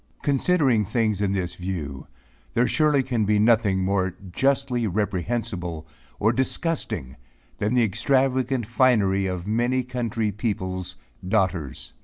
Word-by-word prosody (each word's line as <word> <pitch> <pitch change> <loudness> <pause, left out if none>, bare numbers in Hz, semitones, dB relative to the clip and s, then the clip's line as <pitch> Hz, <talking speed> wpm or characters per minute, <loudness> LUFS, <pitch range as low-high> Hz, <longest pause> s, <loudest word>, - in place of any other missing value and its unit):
Considering 140 -5 +2
things 110 -1 0
in 100 -2 +1
this 90 -3 -2
view, 80 -7 -5 0.5
there 120 - +4
surely 150 -3 +3
can 120 -4 0
be 105 +1 +2
nothing 110 -2 +3
more 95 -1 0 0.2
justly 135 0 +1
reprehensible 95 -3 -2 0.3
or 110 +3 +3
disgusting 130 - -1 0.4
than 105 +4 0
the 125 - +4
extravagant 130 +3 +1
finery 105 -5 +2
of 90 -1 -4
many 120 +4 +1
country 115 -4 -2
people's 95 -4 -3 0.3
daughters. 95 - -1
110 Hz, 120 wpm, -24 LUFS, 95-125 Hz, 0.5 s, there